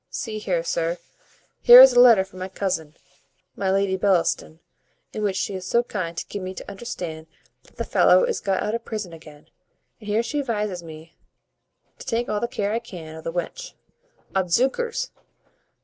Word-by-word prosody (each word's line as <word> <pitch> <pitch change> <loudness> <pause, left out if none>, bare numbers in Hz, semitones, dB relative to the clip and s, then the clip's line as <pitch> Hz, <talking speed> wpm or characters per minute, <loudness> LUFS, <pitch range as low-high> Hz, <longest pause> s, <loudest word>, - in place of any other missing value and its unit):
See 215 -3 -5
here, 180 -5 -1
sir, 170 0 -1 0.6
here 245 +1 +10
is 260 0 +10
a 245 - +5
letter 235 -6 +7
from 190 -1 -14
my 185 - -4
cousin, 165 -6 -3 0.6
my 195 - -1
Lady 195 0 +1
Bellaston, 180 -4 0 0.5
in 215 - -4
which 200 -2 0
she 200 - -2
is 185 -1 -6
so 235 +3 +2
kind 170 -7 -5
to - - -4
gi' 205 - -5
me 185 0 -6
to - - -9
understand 175 -7 -7 0.4
that - - -23
the - - -3
fellow - - +4
is 485 -2 -1
got 195 -1 -1
out 210 - -2
of 230 0 -3
prison 210 -7 -6
again; 155 -2 -14 0.5
and 215 - -13
here 215 +2 +1
she 290 +6 -3
advises 210 -8 -2
me 160 0 -12 0.8
to - - -11
take 235 +1 -1
all 210 - 0
the 235 - -1
care 205 -3 -2
I 230 - 0
can 175 -9 -10
o' 160 - -9
the 165 - -4
wench. 340 - -5 0.6
Odzookers! 265 - 0
195 Hz, 185 wpm, -23 LUFS, 170-230 Hz, 0.8 s, here